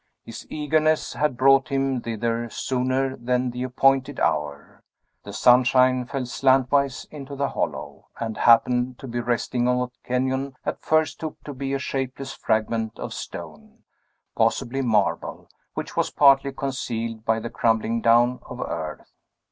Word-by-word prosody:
His - - -10
eagerness 155 +1 +1
had 150 -4 0
brought 135 +1 +5
him 135 -2 0
thither 115 +1 -2
sooner 130 +2 -1
than 125 +1 -1
the 125 +1 -6
appointed 135 +2 +2
hour. 75 -2 -2 0.4
The - - -8
sunshine 125 0 +4
fell 135 -1 -3
slantwise 135 +1 +2
into 140 -2 -8
the 140 0 -1
hollow, - - -4
and 110 -1 -3
happened 125 +2 +3
to 135 - -9
be 120 0 -3
resting 120 0 -1
on 125 0 +2
what 125 0 -5
Kenyon 130 +2 -1
at - - -3
first 155 0 +1
took 155 -1 -6
to 145 - -7
be 135 +1 -3
a - - +1
shapeless 135 0 -4
fragment 110 0 -1
of - - -6
stone, - - -9 0.5
possibly 135 +3 0
marble, 110 -6 0 0.3
which - - -5
was - - +1
partly 140 -1 +4
concealed 115 -5 -4
by 110 0 +1
the 115 - -6
crumbling 115 0 +1
down 120 +2 +4
of 125 - -8
earth. 80 - -5
125 Hz, 150 wpm, -24 LUFS, 120-135 Hz, 0.5 s, brought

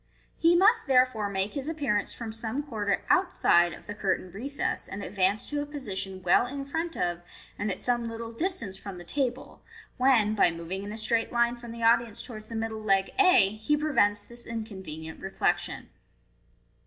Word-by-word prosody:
He 335 +1 +4
must 445 +4 +4
therefor*, 250 -5 +3
make 195 +1 -1
his 280 0 -4
appearance 285 -11 -1
from 230 -2 -6
some 225 +5 -2
quarter 210 -8 -2
outside 175 - +4
of - - -11
the 205 - -5
curtained 190 -3 -2
recess, 275 +8 -3
and 200 +1 -6
advance 195 +2 +1
to 290 0 -1
a - - -3
position 195 -10 -5
well 180 +7 +4
in 275 +2 -5
front 325 +4 -3
of, 175 0 -1 0.4
and 205 - -1
at 185 - -4
some 240 -2 0
little 230 0 -6
distance 230 - -3
from 195 -2 -8
the 175 - -9
table, 255 +5 -3 0.4
when, 245 -5 +4
by 205 - +4
moving 170 +3 -5
in 200 +1 -6
a 215 - -6
straight 225 +1 0
line 235 0 +2
from 240 -1 -10
the 230 0 -6
audience 230 -1 +3
towards 215 -4 -10
the 230 - -7
middle 220 -1 -3
leg 195 -2 +2
a, 365 - +7
he 220 +8 0
prevents 235 -9 +2
this 240 0 -13
inconvenient 190 -9 -6
reflection. 195 0 -1
225 Hz, 180 wpm, -28 LUFS, 195-260 Hz, 0.4 s, a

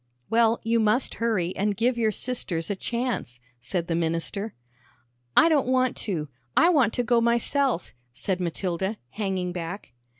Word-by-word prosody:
"Well, 230 0 +4
you 230 +1 +2
must 220 +4 +2
hurry, 195 -7 0
and 205 0 0
give 245 +2 +2
your 230 -2 +2
sisters 200 -8 -2
a - - 0
chance," 235 - -3 0.2
said 165 +8 -2
the 170 - -2
minister. 165 +6 -2 0.8
"I - - +8
don't 295 -6 +3
want 255 -1 +2
to; 165 -8 -3 0.3
I 335 - +7
want 275 -10 +4
to 245 - 0
go 240 0 +3
myself," 235 -1 +1 0.2
said 180 +9 -2
Matilda, 185 +3 -2
hanging 190 -4 -2
back. 175 -3 -6
210 Hz, 155 wpm, -26 LUFS, 180-235 Hz, 0.8 s, I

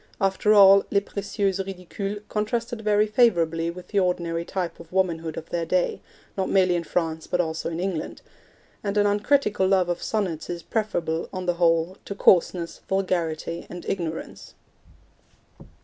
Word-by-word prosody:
After 195 +1 +2
all, 200 -1 +8
Les 200 - +3
Precieuses 200 -1 -2
Ridicules 195 +2 -6
contrasted 230 +2 -2
very 210 0 +3
favourably 170 -8 +2
with 180 +1 -9
the 200 - +2
ordinary 170 -2 0
type 180 -1 -4
of 170 -1 -13
womanhood 165 -4 -1
of 165 - -8
their 170 -1 -1
day, 175 +2 0 0.3
not 190 -1 -1
merely 185 -2 +3
in 170 - -1
France, 160 -1 -2
but 180 - -1
also 160 -1 -1
in 165 0 -4
England; 180 -3 -3 0.6
and 200 0 -2
an 205 - +4
uncritical 205 -1 +2
love 185 -2 +3
of 175 0 -2
sonnets 190 -8 -2
is 175 -1 -5
preferable, 170 -8 -2
on 185 -1 -5
the 175 - +2
whole, 165 +2 +2
to 200 - -5
coarseness, 175 -3 +3
vulgarity 170 -4 -1
and 175 -1 -8
ignorance. 165 -4 -5
185 Hz, 155 wpm, -25 LUFS, 170-200 Hz, 0.6 s, all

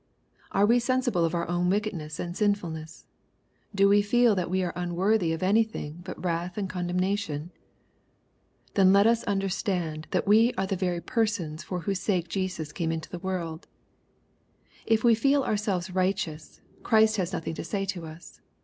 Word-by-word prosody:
Are 200 - +3
we 235 +3 +4
sensible 245 -7 +1
of 165 - -1
our 170 - -1
own 175 +1 0
wickedness 180 -7 -2
and 175 0 -4
sinfulness? 170 -7 -2 0.7
Do 195 0 +5
we 205 +1 +5
feel 235 +2 +4
that 180 -3 -1
we 185 +1 0
are 175 - -2
unworthy 180 +1 +1
of 165 +2 -3
any 210 +5 +4
thing 170 -8 -7
but - - -8
wrath 175 +2 -2
and 200 -2 -1
condemnation? 180 -3 -2 1.2
Then 190 -1 +5
let 200 +1 +5
us 230 0 +3
under 195 -1 0
stand 175 -5 -2
that - - -1
we 225 +4 +5
are 195 - -1
the 195 0 -1
very 180 -2 -1
persons 185 -10 -1
for 180 -2 -4
whose 195 +1 -2
sake 180 -4 -1
Jesus 180 -5 -3
came 165 0 -2
into 160 -1 -5
the 180 - -5
world. 170 -3 -4 1.2
If 225 -1 +2
we 235 -1 +6
feel 275 +5 +3
ourselves 205 -5 -1
righteous, 185 -4 -2 0.2
Christ 220 -1 +4
has 185 -2 -1
nothing 165 -3 -3
to - - -5
say 195 -2 -2
to 180 -4 -4
us. 160 +2 -13
185 Hz, 175 wpm, -27 LUFS, 170-205 Hz, 1.2 s, we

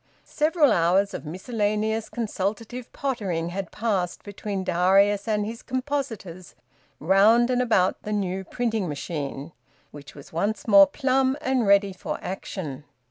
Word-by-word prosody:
Several 305 -1 +2
hours 185 +4 +2
of - - -6
miscellaneous 215 +4 -1
consultative 230 +2 -4
pottering 195 -12 -2
had 190 0 -5
passed 195 -6 -2
between 200 -1 -5
Darius 195 +4 +3
and 210 -1 0
his 230 +2 -6
compositors 255 - -4 0.4
round 215 +8 +4
and 250 0 +2
about 205 -7 +2
the 210 - -6
new 190 -2 -2
printing 220 -4 -2
machine, 145 0 -5 0.4
which 145 -1 -12
was 140 +1 -13
once 205 +7 -2
more 200 -2 +8
plumb 265 0 +1
and 260 -6 0
ready 200 -1 +4
for 180 - -5
action. 175 -7 -6
205 Hz, 135 wpm, -25 LUFS, 180-235 Hz, 0.4 s, more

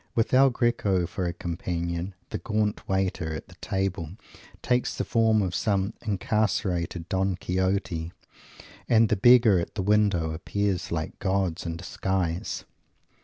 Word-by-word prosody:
With 115 +1 +1
El 135 +1 +7
Greco 115 -7 +1
for 90 +1 -3
a 85 - -2
companion, 85 +1 -3 0.2
the - - -3
gaunt 105 -2 -1
waiter 95 -4 -1
at - - -8
the - - -15
table 95 -4 -2 0.5
takes 125 0 +1
the - - -1
form 110 -2 +3
of 90 -2 -2
some 100 +1 0
incarcerated 95 -5 -1
Don 95 0 0
Quixote 90 -2 -1 0.8
and 115 -2 +5
the - - +3
beggars 115 -3 +6
at - - -6
the 100 - -1
window 100 -5 +2
appear 100 +4 -1
like 80 -1 -4
gods 95 -3 -1
in 85 0 -3
disguise. 90 -1 -2
95 Hz, 140 wpm, -26 LUFS, 85-105 Hz, 0.8 s, El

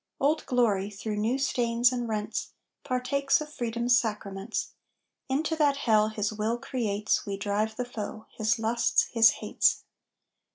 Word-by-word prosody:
"Old 300 +3 +1
Glory," 210 -6 +2
through 210 +1 -5
new 225 +5 +1
stains 240 -3 +2
and 245 -2 -3
rents, 215 0 -3 0.3
Partakes 275 +2 +1
of 305 0 -7
Freedom's 240 -1 +2
sacraments. 205 -1 -4 0.6
Into 305 +4 0
that 290 -3 +3
hell 215 -5 +3
his 215 -1 -2
will 220 +2 -1
creates 215 -5 -1
We 200 -1 -3
drive 210 +2 -1
the 250 - -3
foe 220 -2 -6
his 215 0 0
lusts, 230 +1 +2
his 230 -1 +7 0.2
hates. - - +2
230 Hz, 140 wpm, -28 LUFS, 210-250 Hz, 0.6 s, his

